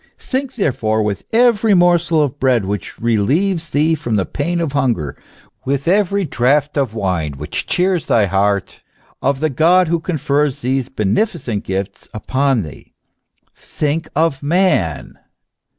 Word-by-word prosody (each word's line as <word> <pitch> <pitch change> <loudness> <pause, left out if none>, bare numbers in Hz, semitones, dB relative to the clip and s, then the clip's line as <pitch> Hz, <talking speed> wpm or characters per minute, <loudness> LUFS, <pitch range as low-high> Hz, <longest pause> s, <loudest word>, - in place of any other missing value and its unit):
* - - -43
Think, 265 0 -4
therefore, 115 - 0
with 100 -2 -3
every 225 -3 +4
morsel 175 -3 +3
of 145 0 -3
bread 125 -6 +2
which 100 +1 -5
relieves 155 - 0
thee 155 +3 +2
from 135 -8 -2
the 95 -3 +1
pain 170 +4 -2
of 160 -5 -2
hunger, 120 - 0 0.5
with 140 +2 -2
every 200 +1 +2
draught 140 +2 +1
of 135 -6 -1
wine 90 -8 -1
which 75 +2 -5
cheers 180 -2 0
thy 110 -3 +3
heart, 100 +1 0 0.4
of 135 +1 0
the 155 - +2
God, 170 +5 +3
who 170 0 +1
con 165 0 -3
fers 145 0 0
these 130 0 -1
beneficent 120 - -1
gifts 95 +1 -4
upon 130 +1 0
thee, 75 - -12 0.6
think 155 +2 -3
of 155 -3 +1
Man 145 - 0
140 Hz, 150 wpm, -18 LUFS, 110-170 Hz, 0.6 s, every